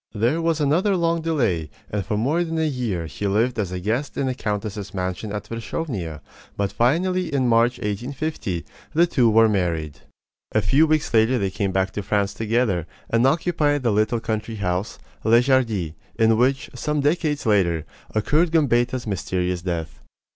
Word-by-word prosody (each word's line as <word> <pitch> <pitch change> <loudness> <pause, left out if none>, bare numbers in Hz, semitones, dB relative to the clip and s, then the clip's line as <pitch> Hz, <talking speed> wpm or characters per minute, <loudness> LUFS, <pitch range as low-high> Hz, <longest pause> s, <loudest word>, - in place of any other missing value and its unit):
There 120 +10 +1
was 165 -1 +1
another 175 +7 +2
long 165 -1 +1
delay, 115 - 0 0.2
and 105 -1 -1
for 105 +1 -2
more 145 +10 +1
than 165 -1 -3
a 160 - +1
year 120 - -2
he 100 +5 -4
lived 115 +4 +1
as 100 -4 -1
a 90 - -3
guest 115 +9 -2
in 140 - 0
the 130 - 0
countess's 105 -3 -4
mansion 95 +3 -3
at 105 0 -4
Wierzchownia; 110 - -4 0.4
but 100 -1 0
finally, 180 +9 +1
in 135 -3 +1
March, 120 +1 +3
1850, 120 - -3 0.3
the 170 +2 +6
two 125 -9 +3
were 110 +1 +6
married. 85 -8 -1 0.5
A - - +3
few 140 - +4
weeks 155 -4 0
later 115 +3 +4
they 100 -4 -1
came 100 -1 -1
back 95 0 0
to 105 - -4
France 100 0 0
together, 110 -6 0 0.2
and 115 +3 +4
occupied 150 -2 +1
the 120 - +2
little 110 +3 +1
country 110 0 -3
house, 95 0 -2 0.3
Les 115 +2 +5
Jardies, 115 - +1 0.2
in 115 0 +4
which, 130 +3 +1
some 150 +4 -1
decades 150 0 0
later, 85 -7 +2 0.3
occurred 150 +11 +2
Gambetta's 125 -5 +2
mysterious 90 -3 -2
death. 85 -3 -4
115 Hz, 170 wpm, -23 LUFS, 100-145 Hz, 0.5 s, the